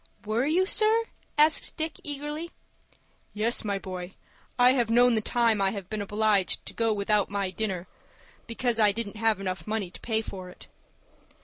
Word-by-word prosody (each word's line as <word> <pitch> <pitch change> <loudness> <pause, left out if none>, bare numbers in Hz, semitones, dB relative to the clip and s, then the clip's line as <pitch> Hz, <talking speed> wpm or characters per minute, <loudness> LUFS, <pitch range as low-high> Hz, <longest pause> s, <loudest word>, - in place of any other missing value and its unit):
"Were 225 +5 0
you, 355 +5 +2
sir," 435 +3 +4 0.3
asked 305 +1 +3
Dick, 315 0 -3
eagerly. 295 +3 -5 0.9
"Yes, 225 +3 +2
my 200 -2 -1
boy, 185 -1 -7 0.4
I 250 0 +6
have 245 -4 +1
known 245 +1 +5
the 220 - +2
time 230 -2 +2
I 195 - +3
have 195 -1 -7
been 215 -1 -2
obliged 205 -1 +1
to - - -5
go 230 -1 +1
without 210 0 +1
my 200 -2 -2
dinner 190 -3 -3 0.6
because 235 0 -1
I 210 -2 +5
didn't 220 -1 -4
have 225 -2 +1
enough 190 0 -4
money 210 -4 -2
to - - -11
pay 220 -1 0
for 185 -3 -8
it." - - -13
220 Hz, 175 wpm, -27 LUFS, 200-245 Hz, 0.9 s, I